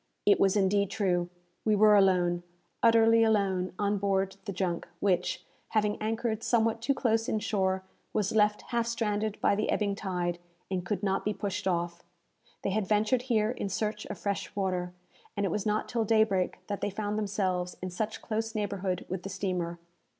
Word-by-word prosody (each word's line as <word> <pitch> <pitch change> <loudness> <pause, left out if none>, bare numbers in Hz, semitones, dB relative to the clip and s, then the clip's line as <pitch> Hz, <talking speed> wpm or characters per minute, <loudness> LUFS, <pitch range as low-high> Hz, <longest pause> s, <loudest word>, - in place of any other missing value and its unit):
It 205 - +5
was 195 0 +4
indeed 200 0 +2
true. 175 -4 0 0.3
We 215 -1 +3
were 210 +1 +6
alone, 180 -3 +3 0.4
utterly 230 0 +6
alone, 195 -4 +2
on 205 0 0
board 195 -1 0
the 200 - -3
junk, 180 -2 -2
which, 180 -3 0 0.2
having 210 -1 0
anchored 220 0 -1
somewhat 230 -1 +1
too 270 +4 +1
close 225 -3 +1
in - - +1
shore, 190 -3 0 0.3
was 210 -3 0
left 210 -1 +3
half 235 -1 0
stranded 215 -2 -1
by - - +4
the 210 +1 0
ebbing 205 -2 +1
tide, 180 -4 -2 0.3
and 185 -2 -1
could 205 +2 -3
not 195 -1 +1
be 210 0 -1
pushed 200 -2 -3
off. 175 -1 -1 0.6
They 195 - 0
had 205 -1 0
ventured 215 +4 +2
here 220 -1 +3
in 205 -5 -3
search 210 +2 -2
of - - -6
fresh 200 -1 -3
water, 185 -3 -1 0.5
and 200 - +1
it 190 - 0
was 210 +3 -1
not 210 +1 0
till 235 -2 0
daybreak 215 -4 +2
that 205 -1 -4
they - - 0
found 205 +1 -3
themselves 190 -4 -1
in 185 0 -5
such 215 +4 -3
close 225 +1 -2
neighbourhood 200 -3 -2
with 185 -1 -4
the 195 - -6
steamer. 180 -3 -2
205 Hz, 180 wpm, -29 LUFS, 185-215 Hz, 0.6 s, were